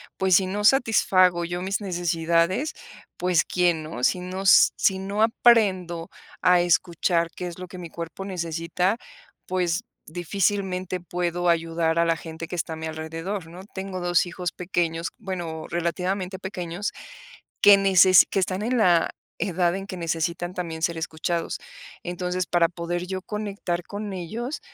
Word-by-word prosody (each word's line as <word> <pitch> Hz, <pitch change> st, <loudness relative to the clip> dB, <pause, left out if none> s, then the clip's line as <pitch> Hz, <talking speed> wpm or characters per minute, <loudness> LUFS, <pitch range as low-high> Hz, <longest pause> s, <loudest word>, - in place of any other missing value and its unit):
pues, 190 Hz, -1 st, +3 dB
si 190 Hz, -, +4 dB
no 205 Hz, +2 st, -3 dB
satisfago 190 Hz, -8 st, +4 dB
yo 175 Hz, +1 st, -3 dB
mis 195 Hz, +3 st, -2 dB
necesidades, 175 Hz, -, +1 dB, 0.5 s
pues, 180 Hz, -2 st, +2 dB
¿quién, 175 Hz, -3 st, +1 dB
no? 125 Hz, -5 st, -2 dB
Si 180 Hz, -, +1 dB
no 185 Hz, +2 st, -5 dB
si 190 Hz, 0 st, +5 dB
no 200 Hz, +3 st, -3 dB
aprendo 190 Hz, -8 st, +3 dB, 0.3 s
a 180 Hz, -1 st, +5 dB
escuchar 170 Hz, -1 st, +1 dB
qué 180 Hz, -, -4 dB
es 175 Hz, +1 st, -8 dB
lo 185 Hz, -, -7 dB
que 185 Hz, -, -10 dB
mi 170 Hz, -2 st, -7 dB
cuerpo 170 Hz, +3 st, -7 dB
necesita, 175 Hz, +1 st, -1 dB, 0.5 s
pues 180 Hz, +2 st, 0 dB, 0.3 s
difícilmente 185 Hz, +1 st, -1 dB
puedo 175 Hz, +1 st, -1 dB
ayudar 165 Hz, 0 st, +1 dB
a 170 Hz, -, +4 dB
la 165 Hz, 0 st, +1 dB
gente 160 Hz, +1 st, -7 dB
que 180 Hz, -, -5 dB
está 165 Hz, -1 st, -3 dB
a -, -, -4 dB
mi 160 Hz, 0 st, -5 dB
alrededor, 165 Hz, +4 st, -5 dB
¿no? 170 Hz, +3 st, -11 dB
Tengo 190 Hz, -1 st, -4 dB
2 175 Hz, 0 st, +2 dB
hijos 175 Hz, 0 st, -4 dB
pequeños. 170 Hz, -2 st, -2 dB
Bueno, 175 Hz, -6 st, -5 dB
relativamente 180 Hz, +2 st, -2 dB
pequeños, 185 Hz, 0 st, -4 dB, 0.7 s
que 205 Hz, -1 st, +9 dB
necesi 190 Hz, -1 st, +6 dB
que -, -, -2 dB
están 185 Hz, 0 st, 0 dB
en 240 Hz, +4 st, 0 dB
la 175 Hz, -7 st, +4 dB, 0.3 s
edad 180 Hz, -2 st, +1 dB
en 195 Hz, 0 st, -5 dB
que 185 Hz, -, -6 dB
necesitan 170 Hz, +1 st, -2 dB
también 165 Hz, -3 st, -5 dB
ser 170 Hz, 0 st, 0 dB
escuchados. 165 Hz, +1 st, -2 dB, 0.5 s
Entonces, 180 Hz, +1 st, -2 dB
para 170 Hz, -1 st, +3 dB
poder 175 Hz, +1 st, -4 dB
yo 185 Hz, 0 st, -4 dB
conectar 200 Hz, -4 st, -3 dB
con 205 Hz, 0 st, -6 dB
ellos, 225 Hz, -, -5 dB
180 Hz, 155 wpm, -25 LUFS, 170-190 Hz, 0.7 s, que